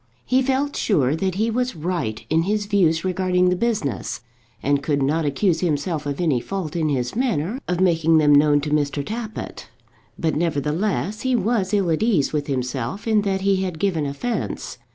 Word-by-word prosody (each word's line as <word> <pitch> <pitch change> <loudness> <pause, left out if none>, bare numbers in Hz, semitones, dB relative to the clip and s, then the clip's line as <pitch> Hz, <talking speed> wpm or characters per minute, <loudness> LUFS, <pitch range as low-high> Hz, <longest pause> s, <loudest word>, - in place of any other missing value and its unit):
He 260 +1 +3
felt 270 +2 0
sure 150 - +2
that 190 0 -1
he 220 +3 0
was 250 +2 -1
right 160 -9 -3
in 160 +1 +2
his 205 +4 0
views 180 -5 +2
regarding 180 -1 +2
the 180 - +2
business, 190 - -2 0.4
and 140 0 +2
could 140 -1 0
not 155 +4 +1
accuse 160 +4 +1
himself 155 -2 -1
of 140 -1 -3
any 155 -8 +2
fault 175 +2 -5
in 160 -2 +1
his 130 +2 -1
manner 230 - -1
of 180 0 -1
making 165 -3 +3
them 150 -2 +5
known 145 0 +5
to 150 +1 -4
Mr. 145 -1 0
Tappitt; 220 +2 -6 0.5
but, 160 -2 0
nevertheless, 170 +6 -1
he 260 -1 +1
was 210 -3 0
ill 195 -5 +2
at 160 - 0
ease 195 - +2
with 150 -2 -1
himself 130 - -3
in 215 -2 +3
that 195 -1 -1
he 195 0 +2
had 185 -3 -2
given 165 -5 0
offence. 225 +13 -4
170 Hz, 185 wpm, -22 LUFS, 145-205 Hz, 0.5 s, them